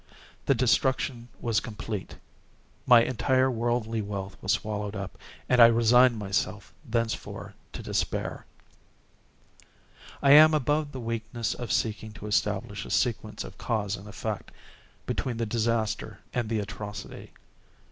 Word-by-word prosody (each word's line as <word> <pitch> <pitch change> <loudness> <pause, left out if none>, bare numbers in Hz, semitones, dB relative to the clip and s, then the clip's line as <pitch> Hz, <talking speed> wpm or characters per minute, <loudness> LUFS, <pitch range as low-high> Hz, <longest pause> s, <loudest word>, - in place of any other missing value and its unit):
The 140 - +4
destruction 125 0 +1
was 115 -3 +1
complete. 105 -3 -6 0.7
My 120 -2 +8
entire 130 +1 +2
worldly 115 -1 -1
wealth 100 -1 -5
was 95 - 0
swallowed 105 -1 -3
up, 100 -2 -5 0.3
and 125 -1 +5
I 115 - +11
resigned 120 +1 +5
myself 100 0 -2
thenceforward 115 -1 -3 0.2
to - - -7
despair. - - -2 1.7
I 140 - +4
am 155 +2 +9
above 150 +1 0
the 130 - -6
weakness 115 0 -3
of 120 - -5
seeking 110 -1 -1
to 105 - -10
establish 105 - -1
a - - -9
sequence - - -1
of - - -11
cause 105 -3 -1
and 100 +1 -11
effect, 105 - -5 0.6
between 125 -3 -2
the 115 - -1
disaster 115 0 -1 0.2
and 120 -3 -1
the 115 - 0
atrocity. 105 0 -7
115 Hz, 130 wpm, -27 LUFS, 105-125 Hz, 1.7 s, I